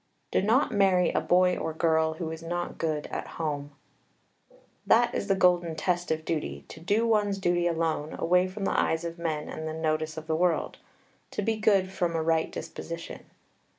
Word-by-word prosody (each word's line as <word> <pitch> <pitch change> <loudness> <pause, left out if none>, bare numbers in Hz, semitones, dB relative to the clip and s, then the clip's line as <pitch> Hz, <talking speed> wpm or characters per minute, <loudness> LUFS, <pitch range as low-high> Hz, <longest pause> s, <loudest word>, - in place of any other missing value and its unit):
Do - - +2
not 225 +8 +3
marry 190 -4 +3
a - - 0
boy 180 0 +3
or 160 - -3
girl 160 -1 +2
who 160 0 -5
is 160 0 -7
not 175 +1 -4
good 155 -2 -1
at - - -4
home. 145 -3 -3 1.2
That 240 +2 +4
is 200 - -2
the 195 - +3
golden 175 -3 +3
test 175 +2 -1
of 160 0 -1
duty, 70 - -3
to - - -10
do 205 +7 +1
one's 210 -3 +2
duty 175 -2 +1
alone, 160 -2 -1
away 180 +2 +3
from 195 +2 -5
the - - +1
eyes 160 +1 0
of 170 0 -6
men 155 -3 -2
and 160 0 -5
the 155 - -3
notice 155 0 -1
of 160 - -6
the 160 0 0
world; 175 0 0 0.5
to 210 - -3
be 225 +2 +1
good 200 -4 +3
from 175 -3 -1
a 160 - 0
right 160 0 +1
disposition. 170 0 -7
170 Hz, 190 wpm, -28 LUFS, 160-185 Hz, 1.2 s, That